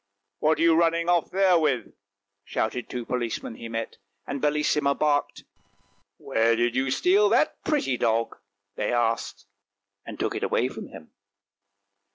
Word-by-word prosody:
" 100 - -56
What 155 +1 +2
are - - 0
you 165 -1 +5
running 170 +1 +2
off 175 -2 +2
there 185 -2 +3
with? 135 -8 -1 0.2
" 100 0 -60
shouted 115 +4 -3
two 120 -2 -5
policemen 120 -3 -3
he 115 0 -9
met, 115 0 -5 0.3
and 140 - -5
Bellissima 150 -1 +1
barked. 145 -1 0 0.4
" - - -39 0.3
Where 115 +1 +1
did 120 +1 0
you 135 +1 +1
steal 390 - +3
that - - +1
pretty 275 - 0
dog? 115 0 0 0.2
" 100 0 -56
they 105 - -1
asked, 120 -1 -1 0.6
and - - -9
took - - -1
it - - -4
away - - 0
from - - -8
him. 80 - -13
130 Hz, 170 wpm, -25 LUFS, 115-165 Hz, 0.6 s, you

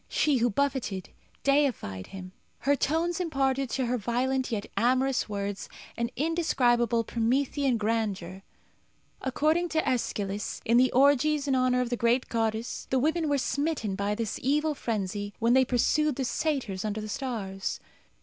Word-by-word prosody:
She, 295 -3 +2
who 240 0 +2
buffeted, 240 -6 -1 0.3
deified 270 - +1
him. 185 -1 -9 0.3
Her 280 +3 +3
tones 325 +5 0
imparted 275 -6 0
to 260 +2 -1
her 245 +1 0
violent 255 +4 0
yet 210 -3 -2
amorous 255 +1 +2
words 200 -1 -4 0.3
an 235 0 -1
indescribable 245 -7 +2
Promethean 255 +3 +1
grandeur. 205 -4 -2 0.8
According 310 +6 +1
to 320 -1 +1
Æschylus, 205 -5 -2
in 230 +2 +4
the 255 +1 +4
orgies 285 +2 +3
in 275 - +2
honour 255 -1 +2
of 245 -1 -3
the 245 - 0
great 235 +2 +1
goddess 225 0 -2
the 260 - +2
women 315 +4 +1
were 285 - +2
smitten 280 -6 -1
by 200 +2 -1
this 225 -2 -3
evil 300 +4 +1
frenzy 205 -5 -3
when 230 +1 +2
they 260 0 +6
pursued 275 +4 +2
the 265 - -2
satyrs 245 -9 -1
under 215 0 -2
the 215 - -5
stars. 205 -6 -4
250 Hz, 150 wpm, -28 LUFS, 220-280 Hz, 0.8 s, they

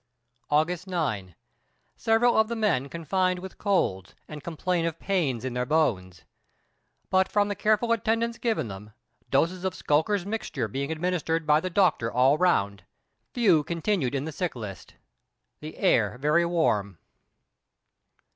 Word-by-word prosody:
August 160 +5 +1
9. 110 - -3 0.6
Several 230 +2 +2
of 220 0 +4
the 235 - -3
men 175 - 0
confined 185 +3 0
with 190 +1 -9
colds, 95 - 0
and 150 -1 -9
complain 170 +1 -1
of 165 -1 -4
pains 155 - -1
in 130 - -3
their 125 0 -1
bones. 105 - 0 0.9
But 190 0 +3
from 205 0 +2
the 205 - -2
careful 215 +3 +1
attendance 230 +1 0
given 225 - -1
them, 105 +1 -10 0.4
doses 170 +6 +1
of 190 -2 -2
"Skulker's 175 +6 +1
Mixture" 200 - -3
being 140 +7 -4
administered 165 -1 -1
by 150 0 +4
the 185 - -3
doctor 175 - +2
all 130 +3 +4
round, 100 - +1 0.5
few 190 -11 +4
continued 170 - -1
in 135 +1 -2
the 160 - -4
sick 175 +1 -3
list. 105 -5 -8 0.6
The 155 +1 -9
air 115 - +2
very 150 +5 +2
warm. 105 - 0
165 Hz, 145 wpm, -26 LUFS, 130-190 Hz, 0.9 s, of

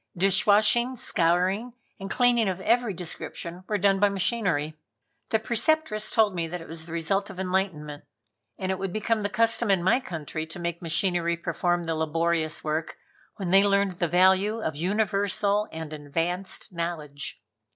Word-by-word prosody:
Dishwashing, 210 +6 +3
scouring 185 +4 +1 0.3
and 195 0 -6
cleaning 240 -4 +3
of 185 0 -3
every 235 +2 +2
description 175 0 -7
were 210 - 0
done 195 0 +3
by 205 0 +4
machinery. 180 -6 0 0.5
The 220 - +3
Preceptress 230 0 0
told 215 -3 +3
me 170 -2 -2
that 175 +2 -5
it 165 - -11
was 160 0 -4
the - - -9
result 195 +5 0
of 190 -2 -9
enlightenment, 180 -6 -2 0.5
and 190 0 -2
it 190 - -3
would 195 -1 -3
become 215 +2 0
the 205 - -1
custom 230 +1 +2
in 190 -3 +3
my 190 +7 +4
country 160 - -5
to 160 - -7
make 170 -1 -3
machinery 170 0 +1
perform 175 +1 -1
the 165 - -1
laborious 160 0 0
work 155 +1 -2 0.4
when 185 -4 -4
they 195 +1 +7
learned 200 -2 +1
the 175 - +1
value 190 +5 +3
of 160 -9 -3
universal 200 +3 +1
and 160 -1 -7
advanced 170 +7 -3
knowledge. 160 -4 -4
185 Hz, 160 wpm, -26 LUFS, 165-205 Hz, 0.5 s, they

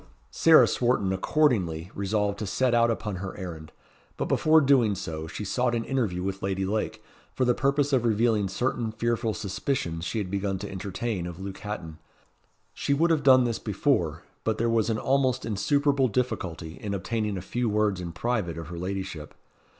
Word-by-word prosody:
Sarah 165 -1 +7
Swarton 120 -6 +1
accordingly 95 - +1
resolved 100 0 -1
to 105 - -3
set 130 +4 +1
out 115 0 +4
upon 105 -4 -2
her 95 +1 -6
errand; 80 -4 -7 0.5
but - - -1
before 160 +1 +4
doing 130 -8 +4
so, 80 -3 -5
she 105 +5 -6
sought 125 +4 0
an 115 - -1
interview 110 -10 -1
with 95 0 -3
Lady 95 0 -1
Lake, 110 +2 -2 0.3
for 130 - +1
the 125 - +4
purpose 140 +2 +1
of 130 -3 +3
revealing 110 -2 +2
certain 115 +3 -1
fearful 115 0 -1
suspicions 95 -4 -2
she 115 - -3
had 100 -4 -3
begun 100 -1 -1
to 100 +1 -7
entertain 95 0 -3
of 85 0 -8
Luke 95 0 -6
Hatton. 100 -7 -6 0.7
She 140 - 0
would 165 +4 +3
have 160 -2 +2
done 130 -2 +6
this 120 -2 -1
before, - - 0 0.2
but 110 -1 0
there 115 0 +1
was 115 -1 +2
almost 130 +3 +1
insuperable 140 +6 +2
difficulty 95 -9 -3
in 100 -1 -3
obtaining 105 +1 -2
a - - -4
few 120 +3 -1
words 105 -3 +1
in 85 -1 -5
private 90 -3 -2
of 80 -2 -7
her 85 -1 -6
ladyship. 95 -4 -5
105 Hz, 180 wpm, -27 LUFS, 95-120 Hz, 0.7 s, Sarah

